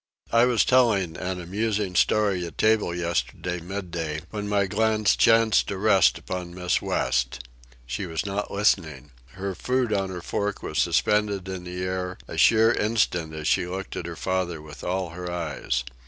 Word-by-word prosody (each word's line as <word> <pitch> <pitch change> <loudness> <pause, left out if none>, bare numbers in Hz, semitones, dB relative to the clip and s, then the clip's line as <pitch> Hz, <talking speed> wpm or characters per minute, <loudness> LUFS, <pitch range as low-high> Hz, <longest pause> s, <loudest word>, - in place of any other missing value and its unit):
I 115 +1 +5
was 120 -3 +3
telling 105 -10 +3
an 95 0 -4
amusing 100 +2 -2
story 100 +1 +2
at 85 - -12
table 110 -5 +2
yesterday 85 +1 -2
midday, 85 -4 -4
when 105 -1 -4
my 100 -1 +2
glance 110 +2 +2
chanced 115 -1 +4
to 100 - -3
rest 95 -2 +4
upon 90 -1 -6
Miss 90 -1 0
West. 65 0 -1 0.4
She 65 +10 -4
was 80 +1 -3
not 100 +1 -3
listening. 80 - 0 0.2
Her 95 +1 -4
food 125 +2 0
on 95 -2 0
her 90 -2 -6
fork 105 +2 -2
was - - -2
suspended 105 -3 +1
in 95 -1 -6
the 90 +1 -5
air 90 0 -3
a - - -7
sheer 115 0 +5
instant 90 -7 0
as 80 0 -4
she 90 - +2
looked 95 +1 -5
at 85 - -4
her 85 - -6
father 90 -2 -2
with 75 -1 -11
all 90 -1 -2
her 90 +1 -6
eyes. 80 -7 -2
95 Hz, 170 wpm, -25 LUFS, 85-105 Hz, 0.4 s, I